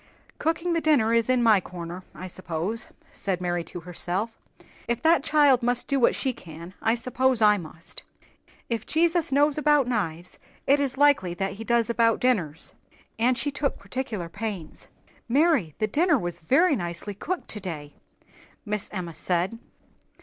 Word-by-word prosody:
"Cooking 330 +2 0
the 330 - +1
dinner 260 -9 +3
is 230 0 +2
in 255 -1 +3
my 215 -4 +5
corner, 175 0 -7
I 185 - -7
suppose," 185 +4 -4 0.2
said 190 -3 -2
Mary 175 -1 -1
to 175 +1 -8
herself. 180 +6 -2 0.5
"If 235 0 0
that 325 -2 +4
child 290 -5 +4
must 245 0 +1
do 275 -1 +1
what 240 - +4
she 265 -2 -1
can, 170 -1 -11
I 225 +1 +2
suppose 255 +1 +1
I 210 -2 +5
must. 160 -1 -9 0.7
If 230 -2 -3
Jesus 335 -1 +1
knows 290 +2 +3
about 295 -2 +4
knives, 180 -8 -3 0.3
it 280 +2 +4
is 275 -2 -1
likely 265 -12 +3
that 195 +2 -2
he 215 +3 -8
does 235 0 +2
about 230 -1 +2
dinners." 180 -12 0 0.5
And 245 +2 +3
she 290 - -1
took 275 0 -2
particular 240 -9 -4
pains. 195 -2 -6 0.4
"Mary, 275 - +2
the 215 - +1
dinner 315 - +3
was 175 -5 -4
very 290 - +4
nicely 175 0 -5
cooked 355 - -4
today," 165 -8 -6 0.7
Miss 210 -1 -3
Emma 180 -4 -5
said. 180 +7 -1
225 Hz, 160 wpm, -26 LUFS, 180-270 Hz, 0.7 s, my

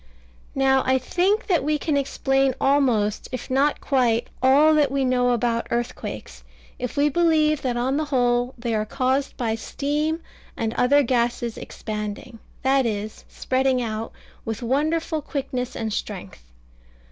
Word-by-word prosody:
Now 265 0 +3
I 260 0 +3
think 370 - +1
that 350 -8 +1
we 300 +1 +1
can 300 0 -1
explain 270 -1 +1
almost, 250 -7 +1
if 255 0 -6
not 280 +3 +2
quite, 240 -4 +1
all 285 +4 +5
that 300 -2 +3
we 275 -1 +1
know 250 -1 +2
about 235 -1 0
earthquakes, 240 +1 -4 0.4
if 250 +3 -5
we 285 +1 +4
believe 310 -1 +2
that 245 -2 -1
on 260 +3 0
the 310 - 0
whole 245 -2 +1
they 235 -1 -3
are 215 -1 +1
caused 265 +4 -1
by 230 -3 -1
steam 295 +7 -2 0.4
and 225 -1 -1
other 285 +4 +4
gases 240 -2 0
expanding, 210 +1 -6 0.2
that 265 -1 +3
is, 215 0 -5
spreading 260 0 0
out, 225 -2 -3 0.3
with 225 +1 -4
wonderful 310 +5 0
quickness 255 -4 -4
and 220 -2 -3
strength. 195 - -6
260 Hz, 145 wpm, -23 LUFS, 235-285 Hz, 0.4 s, all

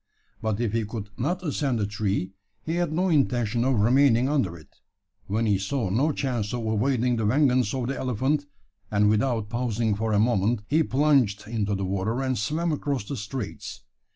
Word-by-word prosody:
But 110 -2 -1
if 115 -3 -1
he 115 -1 +1
could 105 -1 -6
not 175 +8 -2
ascend 140 -5 -1
the 105 - 0
tree, 100 -2 -2 0.3
he 165 +2 -2
had 175 -3 0
no 180 +4 +1
intention 120 -7 +1
of 130 -3 +2
remaining 125 +1 +4
under 130 - 0
it 75 -4 -19 0.5
when 110 +4 0
he 100 -3 +2
saw 100 +1 -2
no 135 +10 +2
chance 125 -6 -2
of 120 -2 -4
avoiding 120 +2 +1
the 110 - -1
vengeance 125 -1 +3
of 130 -2 -2
the 135 +2 -3
elephant 130 +4 0 0.4
and, 105 0 +3
without 110 -1 0
pausing 115 -2 0
for 110 +2 -2
a 105 - +3
moment, 110 -1 +1
he 155 +3 +3
plunged 135 -9 +2
into 105 -3 -1
the 95 0 -2
water, 100 +6 -1
and 130 -1 0
swam 160 +10 -1
across 140 -5 -2
the 125 +7 -5
straits. 105 0 -6
120 Hz, 185 wpm, -26 LUFS, 105-135 Hz, 0.5 s, remaining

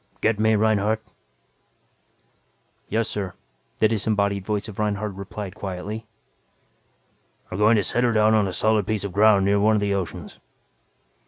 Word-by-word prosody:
Get 110 -1 +1
me, 110 0 +3
Reinhardt?" 110 +1 +1 1.9
"Yes, 110 +1 0
sir," 95 -4 -4 0.4
the 110 - +4
disembodied 100 -2 0
voice 105 0 -2
of 110 -2 -9
Reinhardt 105 -1 -1
replied 100 0 -7
quietly. 105 +2 -6 1.4
"We're 90 - -4
going 110 +2 +5
to 105 - +2
set 120 - 0
her 120 - +3
down 110 0 +3
on 105 -2 +3
a - - -3
solid 110 -1 +1
piece 110 -2 -1
of 100 -3 -5
ground 100 -1 +5
near 100 +1 +3
one 110 +2 +3
of - - +2
the 100 -1 0
oceans." 95 -3 -5
105 Hz, 155 wpm, -23 LUFS, 100-110 Hz, 1.9 s, going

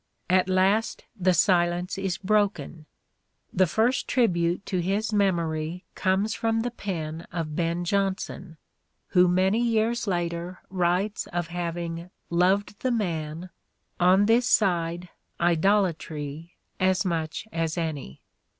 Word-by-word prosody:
At 185 0 +3
last 195 +4 +2
the 185 -3 +2
silence 175 0 +2
is 190 -2 -2
broken. 200 -6 0 0.7
The 185 0 +3
first 235 - +1
tribute 175 -6 +1
to 185 - -1
his 205 +5 -1
memory 170 -3 0
comes 195 +3 +1
from 225 0 0
the 245 +1 -2
pen 165 -7 -5
of 160 -3 -4
Ben 170 +1 -1
Jonson, 190 -3 -2 0.5
who 180 -1 +5
many 190 +5 +2
years 230 0 +1
first - - -5
tnbut« - - +1
later 175 0 -3
writes 185 +3 0
of 175 -1 -3
having 170 0 -4
" - - -46
loved 190 +4 +2
the 260 - 0
man, 170 -6 -2 0.5
on 185 +3 +5
this 235 +3 +3
side 175 -4 +1 0.3
idolatry 165 -3 0 0.2
as 185 0 +2
much 165 +2 -2
as 165 -1 -2
any." 155 - -4
180 Hz, 130 wpm, -26 LUFS, 170-200 Hz, 0.7 s, who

